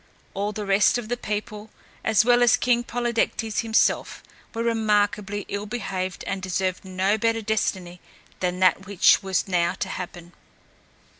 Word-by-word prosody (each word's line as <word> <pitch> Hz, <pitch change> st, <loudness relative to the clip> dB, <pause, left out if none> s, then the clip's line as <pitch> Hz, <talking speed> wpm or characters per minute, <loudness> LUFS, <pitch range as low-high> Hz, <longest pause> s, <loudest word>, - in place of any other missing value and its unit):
All 200 Hz, +2 st, -2 dB
the 210 Hz, 0 st, -5 dB
rest 195 Hz, +4 st, +3 dB
of 230 Hz, -3 st, -6 dB
the 245 Hz, -, 0 dB
people, 210 Hz, -1 st, -5 dB, 0.3 s
as 220 Hz, -1 st, +3 dB
well 245 Hz, 0 st, +4 dB
as 240 Hz, -, +5 dB
King 240 Hz, -1 st, +1 dB
Polydectes 235 Hz, -2 st, -1 dB
himself, 225 Hz, -1 st, +1 dB, 0.3 s
were 230 Hz, 0 st, -3 dB
remarkably 210 Hz, -3 st, 0 dB
ill 205 Hz, +1 st, -4 dB
behaved 190 Hz, -5 st, -4 dB
and 195 Hz, -1 st, -3 dB
deserved 185 Hz, 0 st, -2 dB
no 190 Hz, +3 st, 0 dB
better 225 Hz, 0 st, 0 dB
destiny 185 Hz, -5 st, -2 dB, 0.4 s
than 180 Hz, 0 st, -2 dB
that 190 Hz, +1 st, +3 dB
which 200 Hz, 0 st, +4 dB
was 190 Hz, 0 st, -1 dB
now 175 Hz, -2 st, +1 dB
to -, -, -4 dB
happen. 175 Hz, -1 st, -7 dB
205 Hz, 150 wpm, -24 LUFS, 190-225 Hz, 0.4 s, as